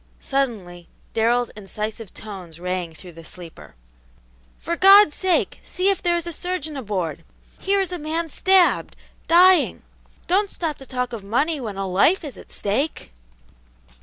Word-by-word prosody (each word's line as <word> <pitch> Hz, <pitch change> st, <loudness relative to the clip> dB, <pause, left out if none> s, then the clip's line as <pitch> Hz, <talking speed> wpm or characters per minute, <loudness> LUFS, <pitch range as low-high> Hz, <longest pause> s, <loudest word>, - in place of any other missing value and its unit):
Suddenly, 205 Hz, -11 st, -3 dB, 0.3 s
Darrell's 235 Hz, +2 st, +1 dB
incisive 210 Hz, +1 st, -6 dB
tones 185 Hz, -6 st, -10 dB
rang 180 Hz, -1 st, -3 dB
through 180 Hz, +3 st, -12 dB
the 165 Hz, 0 st, -13 dB
sleeper. 170 Hz, -, -11 dB, 0.8 s
"For 340 Hz, -, -3 dB
God's 390 Hz, -1 st, +7 dB
sake, 375 Hz, +2 st, 0 dB
see 375 Hz, +2 st, 0 dB
if 390 Hz, -, -3 dB
there 345 Hz, -1 st, +1 dB
is 340 Hz, -, -4 dB
a 340 Hz, -, -5 dB
surgeon 320 Hz, -3 st, -4 dB
aboard! 185 Hz, -, -3 dB, 0.4 s
Here 395 Hz, +1 st, +1 dB
is 375 Hz, -, -2 dB
a 355 Hz, -, -4 dB
man 320 Hz, +2 st, -2 dB
stabbed, 375 Hz, +3 st, +3 dB, 0.3 s
dying; 360 Hz, +2 st, +5 dB, 0.4 s
don't 395 Hz, +3 st, +2 dB
stop 325 Hz, -5 st, -3 dB
to 270 Hz, -, -11 dB
talk 250 Hz, -1 st, -3 dB
of 220 Hz, -4 st, -6 dB
money 275 Hz, +9 st, 0 dB
when 210 Hz, -5 st, -5 dB
a 195 Hz, -, -2 dB
life 205 Hz, -, +3 dB
is 285 Hz, -5 st, -7 dB
at -, -, -14 dB
stake!" 240 Hz, -, -2 dB
265 Hz, 155 wpm, -22 LUFS, -, 0.8 s, God's